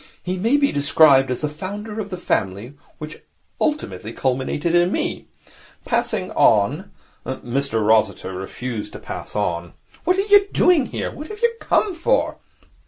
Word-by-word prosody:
He 180 +1 -2
may 225 +10 +2
be 285 -1 +2
described 140 -1 +5
as 125 - -2
the 150 - 0
founder 205 +8 -6
of 205 -2 -4
the 185 - -5
family 105 - -2 0.2
which 155 0 -8 0.4
ultimately 115 - -2
culminated 135 +5 -1
in 175 +1 +4
Me. - - -2 0.6
Passing - - -1
on 140 - +3 0.2
' - - -37
Mr 130 -3 -2
Rossiter 105 -3 +2
refused 105 +4 -6
to - - -8
pass - - -8
on. 85 0 -2 0.3
'What 365 +2 +2
are - - +3
you 410 0 +5
doing 350 -9 +3
here? - - -4
What 300 - -8
have 425 +4 -9
you 470 0 +3
come 405 - +1
for?' 475 +9 0
155 Hz, 160 wpm, -21 LUFS, -, 0.6 s, described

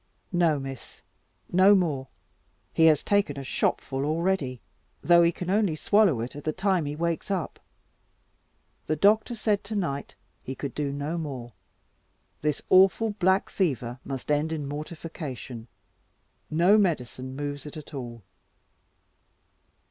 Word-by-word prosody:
"No, 170 -4 +3
Miss, 135 -2 -9 0.5
no 190 +3 +6
more; 150 -8 0 0.7
he 160 - +4
has 155 -3 +5
taken 200 -9 +1
a 140 - -5
shopful 135 0 -1
already, 155 -4 0 0.4
though 170 0 +6
he 170 0 +4
can 180 +1 -4
only 200 -5 +2
swallow 190 - +3
at 120 - -5
the 155 - 0
time 190 -1 +1
he 145 +1 -3
wakes 170 +3 -2
up. 185 -6 -2 1.3
The 155 - +1
doctor 215 - +3
said 210 -2 0
to 215 +2 -5
night 140 -8 -3 0.3
he 130 - -6
could 135 -1 -5
do 145 -2 -2
no 145 +4 -3
more; 130 -7 -6 0.9
this 150 -1 -1
awful 195 +4 +5
black 190 -1 +2
fever 125 - -1
must 135 +1 -5
end 150 +2 +1
in 150 -3 -3
mortification; 145 -5 -7 0.8
no 175 +7 +5
medicine 130 - -1
moves 145 0 -5
it 150 - -9
at 155 0 -11
all." 120 -5 -7
155 Hz, 135 wpm, -27 LUFS, 140-185 Hz, 1.3 s, no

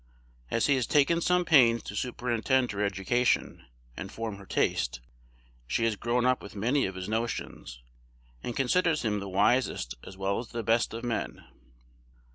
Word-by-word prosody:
As 115 - +1
he 145 - +4
has 125 - -1
taken 150 +4 +3
some 180 +1 +2
pains 120 -8 +5
to 100 - -7
superintend 125 +2 0
her 105 0 -2
education, 100 - 0 0.3
and 95 - -7
form 110 -3 -5
her 100 -1 -13
taste, - - 0 0.7
she 115 - 0
has 115 -2 +1
grown 120 +3 0
up 130 0 +2
with 100 - -11
many 120 +7 +1
of 95 - -7
his 95 0 -5
notions, 110 - -4 0.6
and 120 - -5
considers 155 +2 +2
him 105 -2 0
the 100 0 -6
wisest 95 - +1
as 95 - -11
well 95 +1 -1
as 120 - -6
the 115 0 -5
best 115 +1 +1
of 115 - -6
men. 120 -2 -3
115 Hz, 170 wpm, -28 LUFS, 100-125 Hz, 0.7 s, pains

